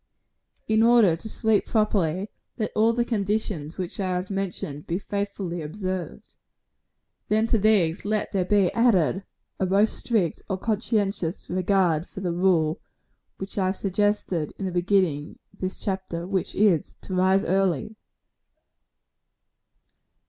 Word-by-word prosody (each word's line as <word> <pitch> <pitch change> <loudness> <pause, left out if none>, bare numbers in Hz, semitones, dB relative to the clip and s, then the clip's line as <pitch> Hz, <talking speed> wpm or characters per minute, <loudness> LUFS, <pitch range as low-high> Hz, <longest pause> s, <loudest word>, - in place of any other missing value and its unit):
In 220 0 +3
order 230 -7 +5
to 220 +7 -8
sleep 220 -1 +1
properly, 200 -4 0 0.3
let 215 -3 -2
all 220 +2 +4
the 235 +1 0
conditions 200 -8 -2
which 185 0 -5
I 185 -2 0
have 180 +2 -3
mentioned 175 -7 -4
be 170 - -1
faithfully 200 -3 -3
observed. 185 +3 -5 0.9
Then 215 +1 +2
to 230 -1 +2
these 190 -6 +2
let 215 +1 -1
there 195 -3 +1
be 195 0 +2
added 195 -6 +3 0.4
a 190 - +1
most 200 +4 +3
strict 205 -9 0
and 190 -1 -1
conscientious 205 -5 -1
regard 180 -3 +2
for - - -9
the 175 -2 -1
rule 170 -2 +2 0.6
which 195 +1 -5
I 190 - +2
have 190 - 0
suggested 195 -5 0
in 195 - -4
the 185 - -2
beginning 175 -5 +1 0.2
of - - -24
this 185 0 -3
chapter 190 -3 -3
which 190 -1 -2
is, 195 -7 +2
to 190 - -7
rise 190 +2 +3
early. 190 +1 0
190 Hz, 140 wpm, -25 LUFS, 175-210 Hz, 0.9 s, order